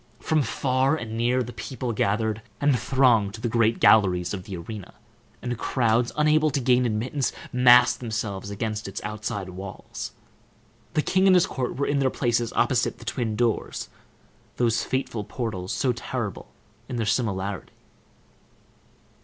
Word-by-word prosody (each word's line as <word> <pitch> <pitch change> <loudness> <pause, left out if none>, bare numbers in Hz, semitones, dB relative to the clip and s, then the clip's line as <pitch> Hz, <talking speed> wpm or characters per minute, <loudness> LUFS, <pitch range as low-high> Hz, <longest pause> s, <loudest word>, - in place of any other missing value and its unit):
From 155 -1 +1
far 135 +1 +1
and 115 -7 -5
near 120 +2 +1
the 120 +1 -8
people 130 -2 -4
gathered, 110 +1 0 0.2
and 145 0 +3
thronged 115 -6 +3
the 115 +2 -3
great 115 -1 +2
galleries 90 -5 +4
of 95 -2 -5
the 95 -3 -6
arena, 100 +3 -8 0.5
and 120 0 -2
crowds, 120 -1 +1
unable 155 +1 +4
to 140 0 -1
gain 125 -1 +3
admittance, 125 +5 -1 0.2
massed 125 -1 +6
themselves 105 -4 -4
against 105 +1 -3
its 100 - -5
outside 105 -2 -4
walls. 95 +1 -7 0.8
The 155 - +2
king 190 +1 +3
and 185 - +7
his 180 - +5
court 130 -2 -3
were 140 - 0
in 145 0 +1
their 135 -1 +3
places, 120 -2 0
opposite 125 -3 +1
the 115 - -13
twin 115 -2 -2
doors, 115 -1 -1 0.7
those 120 -1 +2
fateful 130 -5 -2
portals, 105 -4 -4
so 130 -3 +1
terrible 115 -3 -5 0.4
in - - -4
their 115 -2 -1
similarity. 100 -3 -2
120 Hz, 150 wpm, -25 LUFS, 105-130 Hz, 0.8 s, and